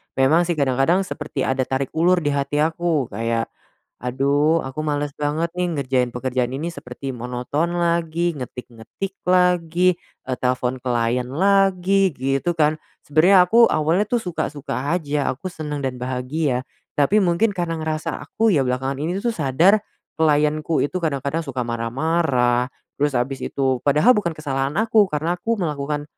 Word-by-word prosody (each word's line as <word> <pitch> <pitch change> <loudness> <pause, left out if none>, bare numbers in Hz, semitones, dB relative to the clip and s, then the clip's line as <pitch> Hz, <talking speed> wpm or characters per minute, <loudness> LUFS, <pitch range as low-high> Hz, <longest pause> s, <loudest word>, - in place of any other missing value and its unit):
memang 135 +6 +4
sih 175 - 0
kadang-kadang 140 +7 +2
seperti 150 -3 -4
ada 130 0 +1
tarik 135 0 -2
ulur 175 +3 +3
di 155 - -3
hati 140 +1 -1
aku. 160 -3 +1
Kayak, 115 +2 -2 0.6
"Aduh 140 +5 +2
aku 135 +2 -6
males 145 -1 -1
banget 150 +3 -1
nih 180 0 0
ngerjain 130 -2 +1
pekerjaan 125 0 -1
ini 140 +5 -3
seperti, 135 -3 -7
monoton 125 +8 -2
lagi, 170 0 0
ngetik-ngetik 125 - -7
lagi, 180 -1 +3 0.3
e - - -3
telfon 125 0 -1
klien 120 0 0
lagi." 195 +2 +3
gitu 135 +5 0
kan. 155 0 +3 0.3
Sebenarnya 180 +5 +5
aku, 230 +4 +6
awalnya 160 +6 +2
tuh 240 - +1
suka-suka 150 -4 -3
aja, 150 -4 -1
aku 145 +8 -6
senang 150 -3 -5
dan 130 -1 -2
bahagia. 130 +1 -1 0.4
Tapi 190 +9 +4
mungkin 180 +5 +2
karena 170 -3 -2
ngerasa 155 0 -3
aku 225 0 +1
ya 140 -5 +3
belakangan 130 +2 -2
ini 165 +5 -2
tuh 240 - +1
sadar, 165 +8 +3 0.4
klienku 150 0 +2
itu 145 +6 -2
kadang-kadang 145 -2 -1
suka 130 -3 -3
marah-marah, 125 +1 0 0.3
terus 145 -1 +1
abis 130 +3 -1
itu 130 -2 0
padahal 150 - +5
bukan 170 -6 -1
kesalahan 140 -1 -2
aku, 220 -2 +4
karena 155 +4 0
aku 230 +4 0
melakukan 150 -3 -2
150 Hz, 150 wpm, -22 LUFS, 130-170 Hz, 0.6 s, aku